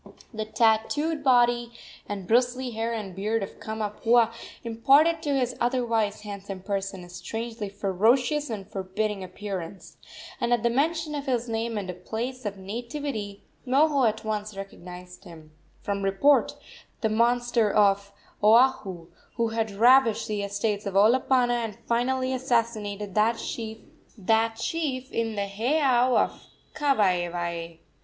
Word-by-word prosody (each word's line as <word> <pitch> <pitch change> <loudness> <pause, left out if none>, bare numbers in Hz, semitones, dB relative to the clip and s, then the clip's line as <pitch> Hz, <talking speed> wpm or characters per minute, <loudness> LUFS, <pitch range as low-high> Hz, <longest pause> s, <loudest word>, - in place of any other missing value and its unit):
The 215 0 -3
tattooed 230 +8 +1
body 240 -2 +3 0.4
and 200 -2 -4
bristly 245 +2 +2
hair 225 +1 -2
and 210 -5 -5
beard 215 +2 -1
of 195 - -9
Kamapuaa 220 +2 +1 0.3
imparted 275 +8 +3
to 290 -3 0
his 250 -1 -1
otherwise 230 -4 0
handsome 200 -2 -7
person 195 -2 -3
a 175 - -12
strangely 225 +4 -5
ferocious 235 +9 +1
and 205 -4 -5
forbidding 195 +1 -3
appearance, 185 -1 -7 0.4
and 235 - -1
at 240 -2 +1
the 235 - +2
mention 305 +4 0
of 285 -1 -4
his 245 -2 0
name 225 0 -2
and 180 -3 -6
place 245 +2 -4
of 200 -1 -5
nativity 220 0 -5 0.2
Moho 275 -2 +4
at 220 +1 -6
once 210 -1 -3
recognized 180 -2 -10
in - - -10
him, 155 -1 -15 0.3
from 200 -1 -2
report, 195 +9 +3 0.5
the 220 - +2
monster 235 0 +2
of 200 -1 +3 0.3
Oahu, 210 -6 +4 0.3
who 230 -2 0
had 225 -1 -1
ravaged 230 +3 +4
the 210 -1 -2
estates 205 +1 -2
of 195 - -4
Olopana 245 +3 +3
and 215 -3 -5
finally 255 +2 0
assassinated 225 -6 -1
that 220 +3 +2
chief 225 - -3
in 225 -1 -2
the 200 -1 -1
heiau 250 +4 +2
of - - -1 0.3
Kawaewae. 175 - 0
225 Hz, 135 wpm, -26 LUFS, 200-245 Hz, 0.5 s, Moho